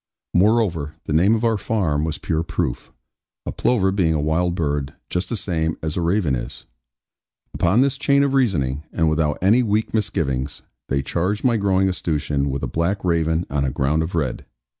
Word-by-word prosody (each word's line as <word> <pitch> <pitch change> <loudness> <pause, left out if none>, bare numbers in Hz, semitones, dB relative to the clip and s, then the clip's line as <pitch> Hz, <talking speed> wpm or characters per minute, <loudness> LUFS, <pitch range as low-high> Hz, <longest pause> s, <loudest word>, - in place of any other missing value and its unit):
Moreover, 90 -7 +2
the 75 - -3
name 95 +8 +4
of 115 +1 -1
our 110 -2 +2
farm 90 -8 0
was 80 0 -3
pure 80 -1 -1
proof; 85 - -3 0.5
a - - -3
plover 95 -6 +1
being 90 -5 +1
a - - 0
wild 85 +4 0
bird, 70 -5 -2 0.2
just 90 0 -1
the 115 - -2
same 80 -4 -1
as 80 -1 -2
a 90 - -1
raven 85 -3 +1
is. - - -7 0.9
Upon 95 +8 +3
this 140 0 +1
chain 140 -1 +3
of 140 -1 0
reasoning, 75 - +1
and 80 -2 +1
without 75 -2 +1
any 110 +7 +5
weak 110 -2 0
misgivings, 70 - -2 0.2
they 70 0 0
charged 90 +8 -1
my 125 -3 +3
growing 95 -2 +2
escutcheon 75 -6 -1
with 70 +1 -3
a - - 0
black 85 +9 -1
raven 85 -1 +1
on 70 -1 0
a 70 - 0
ground 70 +5 0
of 80 +2 -3
red. 70 -7 -2
85 Hz, 185 wpm, -22 LUFS, 75-100 Hz, 0.9 s, any